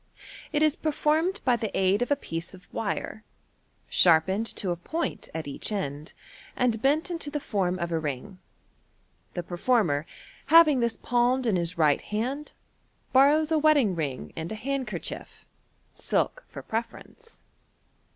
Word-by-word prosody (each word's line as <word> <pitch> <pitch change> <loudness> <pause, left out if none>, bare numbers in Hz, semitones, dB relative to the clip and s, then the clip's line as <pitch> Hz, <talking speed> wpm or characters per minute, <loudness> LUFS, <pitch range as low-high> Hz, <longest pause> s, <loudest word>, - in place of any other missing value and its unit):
It 305 0 +2
is 310 -2 +3
performed 315 +5 0
by 250 -2 +4
the 220 -2 -3
aid 190 +3 +3
of 245 - 0
a 285 - +4
piece 170 - -6
of 180 -1 -17
wire, 220 0 -3 0.6
sharpened 190 +6 +4
to 185 - -1
a - - 0
point 320 - -4
at 160 0 -5
°ach 145 +8 -4
end, 150 -6 -4 0.4
and 235 -4 +1
bent 305 +7 +2
into 330 -4 -3
the 295 0 -3
form 190 -9 -1
of 170 -1 -3
a 165 - +1
ring. 155 +6 -5 1.0
The 175 - -2
performer, 175 - +1 0.4
having 310 -3 +7
this 235 -1 0
palmed 245 +1 +1
in 220 -5 +2
his 170 0 -1
right 150 -3 +3
hand, 255 +8 -3 0.6
borrows 295 +4 +5
a 315 - +3
wedding 290 -9 +4
ring 145 -6 -4
and 160 +1 -5
a - - -3
hand 270 +3 -3
cerchief 185 -6 -7 0.5
(silk - - -1
for - - -9
preference). 230 - -6
225 Hz, 150 wpm, -27 LUFS, 175-290 Hz, 1.0 s, having